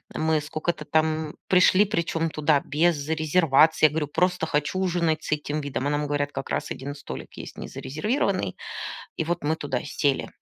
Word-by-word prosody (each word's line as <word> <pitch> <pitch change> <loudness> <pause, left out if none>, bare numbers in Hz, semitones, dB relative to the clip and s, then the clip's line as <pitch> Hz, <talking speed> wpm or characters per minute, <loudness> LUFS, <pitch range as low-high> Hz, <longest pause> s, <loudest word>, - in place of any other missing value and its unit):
Мы 155 -1 +1
скока-то 155 +1 -3
там 155 0 0
пришли, 185 +2 +5
причём 165 -3 -1
туда 150 -1 +2
без 150 -1 +1
резервации. 155 -1 +4
Я - - +7
говорю: 150 -2 -1
"Просто 180 +1 +1
хочу 150 +5 0
ужинать 170 -4 +1
с - - -6
этим 150 0 -1
видом". 140 -2 -3
А 145 - +1
нам 150 0 0
говорят: 145 0 -1
"Как 135 - -5
раз - - -2
1 140 +2 -5
столик 65 - -8
есть - - -8
незарезервированный". 185 - -2 0.6
И 160 - -1
вот 175 0 -2
мы 155 +2 +1
туда 140 -5 -2
сели. 140 -1 0
155 Hz, 175 wpm, -25 LUFS, 145-165 Hz, 0.6 s, Я